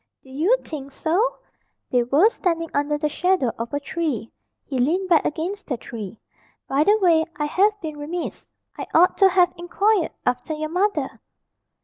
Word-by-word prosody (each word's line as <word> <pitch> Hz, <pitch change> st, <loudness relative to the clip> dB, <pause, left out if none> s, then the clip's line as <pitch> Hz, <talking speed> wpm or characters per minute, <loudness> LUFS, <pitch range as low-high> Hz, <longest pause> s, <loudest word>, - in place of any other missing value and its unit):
"Do 265 Hz, -, -16 dB
you 340 Hz, -, +2 dB
think 280 Hz, -3 st, -7 dB
so?" 360 Hz, -, 0 dB, 0.5 s
They 250 Hz, -, +3 dB
were 280 Hz, -, +4 dB
standing 330 Hz, -6 st, -2 dB
under 290 Hz, +1 st, 0 dB
the 300 Hz, +1 st, 0 dB
shadow 360 Hz, -5 st, +1 dB
of 230 Hz, 0 st, -4 dB
a 285 Hz, -, -1 dB
tree. 285 Hz, -6 st, -3 dB, 0.3 s
He 265 Hz, -2 st, -3 dB
leaned 355 Hz, +9 st, +1 dB
back 335 Hz, -3 st, +5 dB
against 355 Hz, +7 st, -3 dB
the 255 Hz, -, -2 dB
tree. 220 Hz, -3 st, -8 dB, 0.5 s
"By 275 Hz, +2 st, +2 dB
the 415 Hz, +6 st, +4 dB
way, 340 Hz, -6 st, +4 dB
I 295 Hz, -, -1 dB
have 410 Hz, +7 st, +2 dB
been 310 Hz, -3 st, -6 dB
remiss. 325 Hz, +4 st, -5 dB, 0.3 s
I -, -, -6 dB
ought 355 Hz, +3 st, +5 dB
to 390 Hz, -, +7 dB
have 360 Hz, -1 st, +3 dB
inquired 370 Hz, +2 st, +1 dB, 0.2 s
after 250 Hz, +5 st, -1 dB
your 310 Hz, 0 st, -4 dB
mother." 390 Hz, +5 st, -1 dB
320 Hz, 170 wpm, -23 LUFS, 285-365 Hz, 0.5 s, to